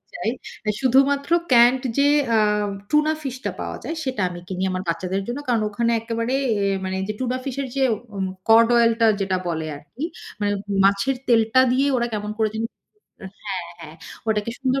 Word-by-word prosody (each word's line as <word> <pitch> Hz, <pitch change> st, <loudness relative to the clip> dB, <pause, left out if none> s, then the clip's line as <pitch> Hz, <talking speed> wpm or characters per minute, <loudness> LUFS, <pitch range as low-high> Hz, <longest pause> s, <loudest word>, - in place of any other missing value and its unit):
চাই। 215 Hz, -, -1 dB, 0.3 s
অ্যা 210 Hz, -, +1 dB
শুধুমাত্র 275 Hz, +3 st, +3 dB, 0.2 s
ক্যান্ড 245 Hz, +2 st, +6 dB, 0.2 s
যে, 280 Hz, +1 st, +5 dB, 0.3 s
আ -, -, +4 dB, 0.5 s
টুনা 300 Hz, +1 st, +3 dB
ফিশটা 260 Hz, -1 st, -4 dB
পাওয়া -, -, -4 dB
যায় 330 Hz, -, -4 dB
সেটা 260 Hz, -5 st, -3 dB
আমি 175 Hz, -1 st, -8 dB
কিনি 185 Hz, -1 st, -4 dB
আমার 185 Hz, 0 st, -2 dB
বাচ্চাদের 185 Hz, +3 st, -1 dB
জন্য। 240 Hz, +4 st, -3 dB
কারণ 235 Hz, -2 st, +2 dB
ওখানে 230 Hz, +3 st, 0 dB
একেবারে 230 Hz, +2 st, -2 dB, 0.2 s
অ্যা 200 Hz, -1 st, +1 dB
মানে 190 Hz, 0 st, -2 dB
যে -, -, 0 dB
টুনা 255 Hz, 0 st, -1 dB
ফিশ 270 Hz, -2 st, -4 dB
এর -, -, -3 dB
যে 270 Hz, -, +1 dB, 0.3 s
উম 190 Hz, -1 st, -1 dB, 0.2 s
কড 230 Hz, +1 st, +8 dB
অয়েলটা 230 Hz, -1 st, +4 dB
যেটা 190 Hz, -1 st, 0 dB
বলে 160 Hz, -2 st, -2 dB
আরকি, 230 Hz, -, -8 dB, 0.4 s
মানে 205 Hz, 0 st, +1 dB, 0.3 s
মাছের 200 Hz, +7 st, +2 dB
তেলটা 230 Hz, +1 st, +4 dB
দিয়ে 270 Hz, +3 st, +2 dB
ওরা 240 Hz, -1 st, 0 dB
কেমন 210 Hz, -1 st, -3 dB
করে 220 Hz, -1 st, +2 dB
যানি 225 Hz, +1 st, -1 dB, 0.8 s
হ্যাঁ, 190 Hz, -3 st, -3 dB, 0.2 s
হ্যাঁ 155 Hz, 0 st, -10 dB, 0.3 s
ওটাকে 215 Hz, +1 st, 0 dB
সুন্দর 265 Hz, 0 st, +1 dB
230 Hz, 180 wpm, -22 LUFS, 195-260 Hz, 0.8 s, কড